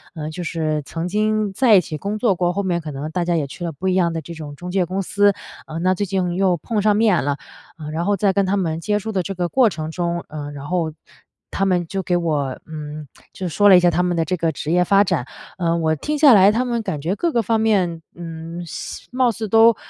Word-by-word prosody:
呃， 155 -1 -5
就 175 +3 -6
是 155 -3 -1
曾 165 +5 -4
经 215 +1 0
在 235 0 +5
一 190 - +6
起 160 - -6
工 200 +7 -3
作 215 -2 +2
过 175 -1 0
后 200 +3 -2
面 175 -2 0
可 155 - -7
能 145 +2 -5
大 180 +1 -1
家 175 0 0
也 155 -3 0
去 175 +6 -9
了 170 - -2
不 170 +5 -5
一 185 - +2
样 175 -3 +2
的 165 - -2
这 170 +3 -9
种 150 -3 -8
中 180 +4 -7
介 190 0 +2
公 185 +3 -2
司。 205 +1 +3 0.3
呃， 155 - -6
那 185 +2 +2
最 200 +2 -2
近 180 -2 -1
又 185 -1 +2
碰 210 +7 -2
上 210 0 +3
面 210 -4 +3
了， 145 0 -1 0.4
呃， 155 -2 -7
然 160 +2 -2
后 205 +1 +1
在 195 0 +2
跟 200 -1 +1
他 200 +2 +1
们 165 -4 -1
接 210 +3 0
触 220 +2 -4
的 195 -3 0
这 195 +2 -5
个 175 -1 -1
过 245 +5 +4
程 160 -4 -5
中， 170 0 -2
呃， 150 -1 -6
然 140 -1 -8
后 170 -1 -1 0.6
他 195 - 0
们 180 -2 +1
就 195 +4 -3
给 180 -1 0
我， 150 -6 -1
嗯， 150 -1 -7 0.3
就 185 - -4
说 205 +6 +3
了 195 - +9
一 - - +8
下 175 0 +4
他 170 +2 +1
们 180 -1 0
的 165 - +1
这 180 +3 -2
个 165 -1 0
职 150 +2 -4
业 180 +1 +3
发 200 +2 +5
展。 175 -10 -1 0.3
呃， 170 -2 +1
我 160 -1 +1
听 300 - -2
下 290 -3 +7
来 195 -2 +7
他 235 +4 0
们 240 -2 -1
感 155 -8 -3
觉 165 +6 -1
各 340 +11 0
个 235 - +3
方 225 +2 +1
面， 190 -7 +1
嗯， 165 0 -7
现 165 - -7
貌 255 0 +2
似 220 -1 -5
都 225 +2 +6
180 Hz, 285 characters per minute, -21 LUFS, 160-200 Hz, 0.6 s, 了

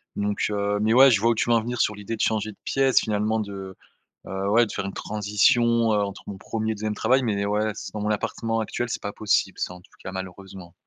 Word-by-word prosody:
donc, 100 0 -1
heu 100 0 -1
mais 110 +1 +2
ouais 135 +1 +8
je 105 - +4
vois 115 +3 +3
où - - +1
tu 120 - 0
veux 120 - +5
en 115 - +3
venir 120 +1 -2
sur 105 - +1
l'idée 105 +2 -5
de - - -5
changer 110 -1 0
de 100 - -18
pièce 135 -1 +3
finalement 110 0 0
de, 95 -2 -7 0.5
heu, 95 +1 -3
ouais 115 +3 +5
de 105 - -8
faire 95 - -3
une 100 - -5
transition, 110 +3 +2
heu, 105 - +2
entre 100 0 -6
mon 100 - -6
1er 110 +2 -3
et - - -3
2e 105 0 -3
travail, 130 +4 +2
mais 100 -3 0
ouais, 105 +1 0
c - - -7
dans 105 - -4
mon 105 - -1
appartement 115 +2 -1
actuel 120 +2 -3
c'est - - -3
pas 100 - -4
possible 110 - 0
ça 90 - -2
en 90 - -13
tout - - -24
cas, 95 - -6
malheureusement. 95 -1 -8
105 Hz, 260 wpm, -24 LUFS, 100-115 Hz, 0.5 s, ouais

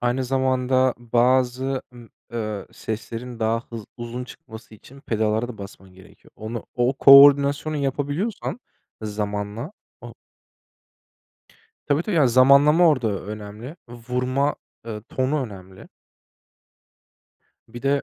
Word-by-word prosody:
aynı 125 +2 0
zamanda 130 0 +1
bazı, 125 +2 +1
ımm, 120 -2 -14 0.2
ııı, 110 -3 -4
seslerin 115 +2 -6
daha 115 +1 0
hız 115 -3 -7
uzun 120 +1 -6
çıkması 110 -2 -13
için 135 +6 -16
pedallara 110 -2 -1
da 110 - -9
basman 95 -2 -11
gerekiyor. 95 -1 -19
Onu 110 +1 -6
o 125 +2 +1
koordinasyonu 140 +2 +6
yapabiliyorsan 145 - -3 0.4
zamanla 105 - -4 0.3
o - - -11 1.7
Tabii, 145 +3 +1
tabii, 195 -4 -2
yani, 140 -5 +4
zamanlama 140 +7 +6
orada 115 -9 0
önemli. 105 - -8
Vurma, 125 +4 -2 0.3
ııı, 105 -2 -6
tonu 130 +4 -1
önemli. 95 -4 -11 1.8
Bir 120 +1 -10
de 140 +1 +1
125 Hz, 110 wpm, -23 LUFS, 110-135 Hz, 1.8 s, koordinasyonu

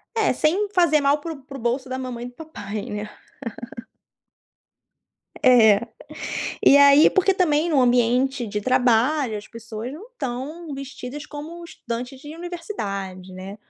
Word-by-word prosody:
É, 435 -11 +2
sem 365 +11 +1
fazer 335 -4 +4
mal 280 +1 +3
para 330 - -5
o 275 - -13
para 275 0 -9
o - - -10
bolso 245 +3 -1
da 260 - -3
mamãe 250 -2 -5
e - - -5
do 245 - -13
papai 215 -10 -6
né? 210 0 -5 2.3
É. 235 -3 +6 0.8
E 280 - +8
aí, 285 +2 +8
porque 385 +1 +3
também 330 -3 +2
no 295 -5 +3
ambiente 245 +1 +2
de 210 0 -3
trabalho 250 +2 +2
as 205 - -11
pessoas 230 +2 -7
não 385 +10 -10
estão 300 - -5
vestidas 275 +1 -7
como 310 +4 -8
estudantes 250 -4 -6
de 295 +2 -9
universidade, 200 - -6
né? 190 +2 -8
260 Hz, 150 wpm, -23 LUFS, 230-305 Hz, 2.3 s, E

